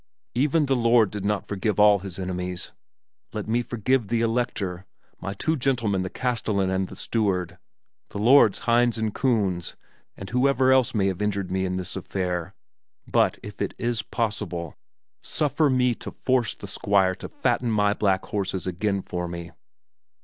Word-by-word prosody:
"Even 150 +5 +2
the 135 -1 +2
Lord 115 -3 +4
did 105 -2 -5
not 105 0 0
forgive 105 0 -2
all 105 -1 +6
his 95 -1 -7
enemies. 90 -1 -4 0.6
Let 105 -1 -4
me 115 +2 +1
forgive 120 0 0
the 115 +2 0
Elector, 110 -6 -1 0.3
my 100 +2 -5
two 160 +10 0
gentlemen 120 -8 +1
the 95 - -3
castellan 110 -6 -1
and 95 0 0
the 95 - -10
steward, 90 -5 -1 0.5
the - - -7
lords 115 0 +5
Hinz 120 0 +3
and 110 -2 -1
Kunz, 100 -9 0 0.4
and 95 - -7
whoever 130 +1 +3
else 130 -3 +3
may 100 -3 +2
have 95 0 -1
injured 100 -3 -1
me 95 0 0
in 90 - -2
this 90 -1 -4
affair; 90 -2 -3 0.5
but, - - +2
if 105 0 -9
it - - -2
is 120 -2 -1
possible, 100 -8 -3 0.5
suffer 150 0 +1
me 125 -2 +3
to - - -8
force 130 -3 0
the - - -9
Squire 95 -2 +2
to - - -8
fatten 125 - 0
my 105 -2 +2
black 95 -2 +1
horses 100 -3 -2
again 95 +2 -1
for 90 0 -4
me." 85 0 -7
105 Hz, 165 wpm, -25 LUFS, 95-120 Hz, 0.6 s, all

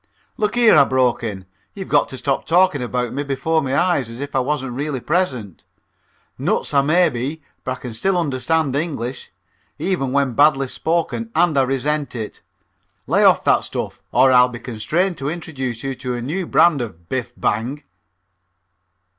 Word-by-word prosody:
"Look 215 +1 -1
here," 235 -2 +6
I 145 - +8
broke 130 -3 +1
in. 100 -5 -5 0.3
"You've 195 -2 -6
got 145 - +2
to 130 - -7
stop 135 +2 -2
talking 175 -4 +3
about 125 0 -2
me 140 - -2
before 145 +4 0
my 135 -3 -3 0.3
face 125 -4 -5
as 115 +1 -9
if 140 0 -6
I - - +4
wasn't 135 -1 -2
really 140 +2 -3
present. 130 - -2 0.8
Nuts - - -1
I 140 - +5
may 170 +6 +4
be, 140 +6 -4 0.2
but 130 - -2
I - - -22
can 125 -3 -6
still 190 - 0
understand 150 -1 0
English, 140 -5 -3 0.5
even 155 -5 -1
when 140 -2 +1
badly 135 0 +3
spoken, 170 - -1
and 170 -2 +3
resent 135 +2 0
it. 110 -3 -6 0.6
Lay - - +2
off - - +5
that - - +3
stuff - - -5
or 130 +2 +5
I'll 125 0 +6
be 120 - -7
constrained 150 - -1
to 140 +1 -2
introduce 135 -8 -5
you 135 0 -2
to 125 -1 -4
a 120 - -4
new 170 +7 -3
brand 155 -6 +4
of 85 -8 -8
'Biff! 125 +1 -3
Bang!'" 125 +7 -1
135 Hz, 175 wpm, -20 LUFS, 125-160 Hz, 0.8 s, I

